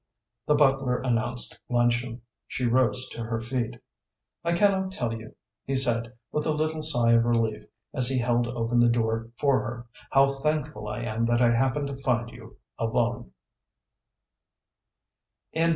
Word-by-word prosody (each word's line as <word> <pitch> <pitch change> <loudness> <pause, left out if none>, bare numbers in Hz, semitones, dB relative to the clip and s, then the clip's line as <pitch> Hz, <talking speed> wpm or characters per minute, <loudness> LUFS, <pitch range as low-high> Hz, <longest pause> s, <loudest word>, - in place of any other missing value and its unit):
The 150 - +4
butler 135 -3 +3
announced 120 -2 -1
luncheon. 120 -1 0 0.2
She 125 - -3
rose 130 +1 +2
to 115 - -6
her 115 0 -2
feet. 120 0 -3 0.6
"I 170 - +1
cannot 190 +1 +2
tell 120 -10 -2
you," 110 -1 -9 0.3
he 135 - -2
said, 120 -3 +2 0.2
with 150 - -1
a - - +2
little 155 +1 -1
sigh 120 -7 +3
of 115 0 +5
relief, 115 -2 0 0.3
as 130 -4 +3
he 130 0 +1
held 120 -1 +1
open 120 0 0
the 120 0 +5
door 115 -1 0
for 140 -2 +3
her, 120 +3 -6 0.2
"how 135 0 +5
thankful 140 -6 -2
I 105 +3 -4
am 115 0 -1
that 120 0 +2
I 120 -1 +4
happened 130 +4 +1
to 140 -1 -5
find 120 -3 -1
you 115 -1 -13 0.2
alone." 120 +1 -1
120 Hz, 150 wpm, -26 LUFS, 115-135 Hz, 0.6 s, of